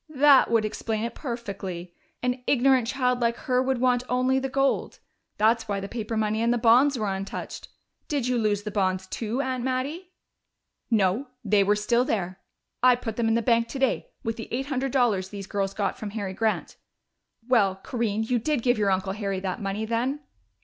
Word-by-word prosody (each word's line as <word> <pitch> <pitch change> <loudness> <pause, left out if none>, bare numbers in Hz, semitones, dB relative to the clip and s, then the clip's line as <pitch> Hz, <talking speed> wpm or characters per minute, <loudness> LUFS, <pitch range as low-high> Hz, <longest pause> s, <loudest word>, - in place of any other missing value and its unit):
"That 280 -1 +6
would 225 -2 +2
explain 220 0 -3
it 235 0 -3
perfectly. 195 - -6 0.3
An 250 0 -1
ignorant 260 -2 +3
child 250 -1 0
like 235 -1 +1
her 250 +1 0
would 260 0 0
want 250 -1 +3
only 255 +1 +2
the 270 0 -3
gold 275 +1 0 0.4
that's 225 +1 +2
why 200 -1 -1
the 195 - -5
paper 225 0 -4
money 215 0 0
and 235 +1 +2
the 240 - +2
bonds 250 +4 +5
were 215 - -1
untouched. 190 +1 -6 0.4
Did 280 -5 -1
you 250 -1 +1
lose 205 -2 0
the 210 - -4
bonds 190 -2 0
too, 225 +6 -3
Aunt 255 -2 -2
Mattie?" 275 +8 -2 0.8
"No, 220 +3 +2 0.2
they 205 -1 +4
were 205 +1 +3
still 235 +4 +2
there. 190 -6 -2 0.4
I 250 0 +6
put 230 -3 -5
them 230 0 0
in 225 - +2
the 230 - +1
bank 230 -1 +3
today, 270 - -1
with 225 -2 -3
the 225 - -6
eight 260 +3 -2
hundred 270 -1 -2
dollars 220 -8 +1
these 200 -1 -7
girls 195 0 -2
got 205 - -2
from 215 - -5
Harry 200 -2 -4
Grant.... 220 +2 -1 0.7
Well, 210 -7 +3
Corinne, 220 +1 -2
you 240 +2 0
did 275 +1 -1
give 245 -3 +2
your 205 -1 +2
uncle 190 0 0
Harry 200 -2 -2
that 190 0 -3
money 200 +2 -2
then?" 245 +6 -1
230 Hz, 195 wpm, -26 LUFS, 205-255 Hz, 0.8 s, That